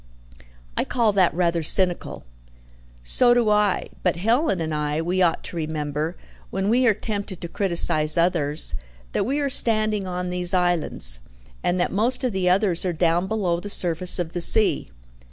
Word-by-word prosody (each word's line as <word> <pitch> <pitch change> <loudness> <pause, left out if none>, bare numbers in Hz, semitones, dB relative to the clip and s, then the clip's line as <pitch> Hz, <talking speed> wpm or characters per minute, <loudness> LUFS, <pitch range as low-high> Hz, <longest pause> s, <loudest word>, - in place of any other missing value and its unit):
"I - - 0
call 230 -4 0
that 190 -3 +3
rather 170 -1 0
cynical." 180 +2 0 0.8
"So 240 - +4
do 235 -3 +2
I. 210 -2 +1
But 180 - 0
Helen 225 - 0
and 160 -1 -3
I, 150 0 -2
we 180 +3 -1
ought 170 -2 +1
to - - -8
remember, 155 0 -4 0.3
when 195 +1 -2
we 250 +2 +2
are 220 - +4
tempted 200 -3 -5
to 170 - -6
criticize 170 -4 +2
others, 165 -3 0 0.4
that - - -1
we 275 +3 -1
are 285 - -1
standing 215 -6 +1
on 180 0 -4
these 180 0 0
islands, 170 - +1 0.4
and 175 +1 0
that 175 - 0
most 240 +6 0
of 250 - 0
the 185 -1 0
others, 185 -2 +2
are 180 -2 -2
down 170 +2 0
below 190 -5 -1
the 205 - -8
surface 180 -2 +2
of 175 -2 -4
the 175 - -4
sea. 215 +4 +3
180 Hz, 170 wpm, -22 LUFS, 170-210 Hz, 0.8 s, So